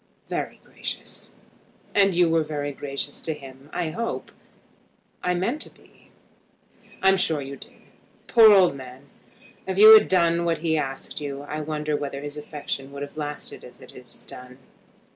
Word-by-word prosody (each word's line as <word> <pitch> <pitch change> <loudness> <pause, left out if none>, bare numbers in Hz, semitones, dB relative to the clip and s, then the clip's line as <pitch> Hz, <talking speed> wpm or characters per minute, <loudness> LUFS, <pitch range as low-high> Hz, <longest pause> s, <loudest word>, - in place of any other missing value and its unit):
"Very - - -4
gracious." - - -6 0.6
"And 195 -2 +4
you 175 0 +4
were 165 -1 +2
gracious 145 -1 -4
to 160 - -3
him, 135 0 -13
I 170 -3 -2
hope." 230 +6 -4 0.9
"I 180 0 0
meant 230 +12 -1
to - - -3
be." - - -24 0.9
"I'm 195 0 +5
sure 160 -5 +2
you 140 0 -6
did. - - -11 0.5
Poor 225 -2 +7
old 185 -7 +5
man! 130 +1 -11 0.6
If 190 0 -2
you 215 +2 +11
had 220 - +8
done 170 -2 +3
what 170 -1 +1
he 160 0 0
asked 135 0 -4
you 140 -1 -5
I 155 +1 -5
wonder 150 0 -2
whether 140 -1 -4
his 145 0 -7
affection 145 -2 -5
would 140 0 -6
have 145 - -9
lasted 150 -1 -5
as - - -13
it - - -13
has - - -13
done." 125 0 -11
150 Hz, 160 wpm, -24 LUFS, 140-180 Hz, 0.9 s, you